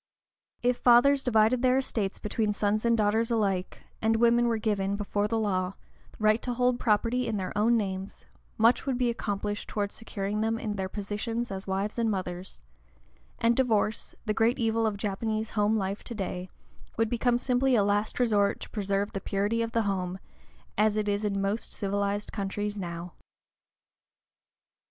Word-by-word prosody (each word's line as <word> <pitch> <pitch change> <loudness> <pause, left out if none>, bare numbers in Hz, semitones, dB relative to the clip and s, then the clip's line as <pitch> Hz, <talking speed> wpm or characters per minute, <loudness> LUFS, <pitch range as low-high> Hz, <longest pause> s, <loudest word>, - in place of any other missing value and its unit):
If 245 0 +2
fathers 270 +3 +5
divided 230 0 +3
their 255 0 +4
estates 215 -7 -1
between 210 0 -1
sons 210 +2 0
and 235 0 +3
daughters 220 +2 +2
alike, 195 -5 -1 0.2
and 225 +1 +2
women 235 +1 +4
were 230 -1 +1
given, 200 -3 0
before 205 0 -1
the 225 +1 -1
law, 190 -3 0 0.4
right 215 +1 +3
to 245 -1 -3
hold 250 0 +2
property 235 +3 +1
in 220 -2 -1
their 185 -1 -4
own 230 +3 +3
names, 195 -2 -4 0.3
much 230 +5 +3
would 260 -2 0
be 245 -1 +2
accomplished 205 -2 -3
towards 205 -1 -2
securing 210 -1 -3
them 225 +1 0
in 215 -2 -3
their 190 -1 -3
positions 215 +4 -3
as 190 0 -5
wives 195 +4 -2
and 230 -1 +2
mothers; 180 - -4 0.7
and 230 +1 +3
divorce, 220 -4 0
the 215 - 0
great 225 +3 +2
evil 225 -2 +1
of 205 -2 -2
Japanese 215 +2 -2
home 210 +1 +2
life 195 0 -3
to 235 - -6
day, 185 -2 -4 0.5
would 225 0 +2
become 240 +1 +1
simply 255 +1 +2
a 210 - +4
last 205 +3 +1
resort 210 -5 +2
to - - -8
preserve 200 -1 -1
the 195 - -4
purity 205 +3 0
of 230 0 -2
the 230 -1 +1
home, 185 -2 -2 0.6
as 215 0 +3
it 210 -1 0
is 205 +1 0
in 200 -1 0
most 200 +3 -2
civilized 200 0 -2
countries 205 0 -3
now. 170 -1 -6
215 Hz, 170 wpm, -28 LUFS, 200-230 Hz, 0.7 s, fathers